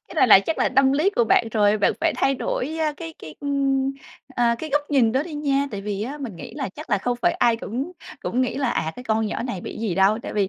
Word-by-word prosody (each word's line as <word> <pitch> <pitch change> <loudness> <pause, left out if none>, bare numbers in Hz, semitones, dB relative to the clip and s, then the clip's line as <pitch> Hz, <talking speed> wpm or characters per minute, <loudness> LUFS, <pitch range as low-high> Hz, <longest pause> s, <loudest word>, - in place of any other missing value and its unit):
cái - - -11
này 285 -5 +4
là 195 - +9
chắc 320 +10 -3
là - - +3
tâm 270 0 +5
lý 315 +8 +2
của 235 - +4
bạn 225 +1 +3
rồi. 210 -1 +3
Bạn - - +3
phải - - +2
thay 275 - +2
đổi, 280 +4 -3
a, 310 -1 +1
cái 325 +1 -8
cái, 155 -1 -10
ưm, 275 -1 0 0.4
à, 240 -3 +1
cái 310 - -6
góc 290 +1 0
nhìn 240 -6 +3
đó 265 +2 +1
đi 320 -2 -8
nha. 280 -1 0
Tại 200 -2 -5
vì 205 0 -3
á 275 +6 -5
mình 235 -10 -6
nghĩ - - -9
là - - -3
chắc - - -10
là 205 - +3
không 245 +4 -1
phải - - +4
ai 235 -1 +2
cũng 260 - -5 0.3
cũng 250 - -1
nghĩ 255 - 0
là 270 -4 0
"À, 160 - -1
cái 250 - -8
con 220 -1 +1
nhỏ 210 - -3
này 220 -8 -4
bị - - -7
gì 215 -6 -2
đâu." 195 +4 +3
Tại - - -6
vì 200 -2 +1
250 Hz, 285 wpm, -23 LUFS, 215-280 Hz, 0.4 s, là